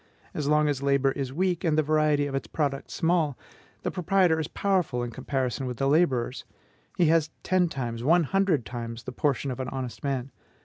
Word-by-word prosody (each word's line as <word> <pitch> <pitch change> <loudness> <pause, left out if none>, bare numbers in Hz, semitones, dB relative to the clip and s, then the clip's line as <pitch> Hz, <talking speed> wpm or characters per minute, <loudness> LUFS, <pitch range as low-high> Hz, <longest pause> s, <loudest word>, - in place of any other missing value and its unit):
As 150 -2 -2
long 150 0 +3
as 140 -2 -1
labor 140 -1 +2
is 135 -1 -4
weak, 180 +4 0
and 160 -3 +2
the 155 - +4
variety 155 -1 +2
of 140 - -4
its 135 - -2
products 140 -3 -2
small, 160 -5 +1 0.5
the - - -1
proprietor 180 -2 +2
is 155 - -2
powerful 180 -11 0
in 120 - -4
comparison 130 +1 -2
with 125 -2 -4
the 135 - +1
laborers; 135 -5 +2 0.5
he 175 - +4
has 160 -1 +3
ten 185 -2 +2
times, 120 -5 -4
one 170 +5 +4
hundred 180 - +1
times, 115 -1 -6
the 130 - -6
portion 140 +1 0
of 125 - -6
an 130 0 -3
honest 130 -1 -6
man. 135 -2 -2
140 Hz, 195 wpm, -27 LUFS, 130-160 Hz, 0.5 s, the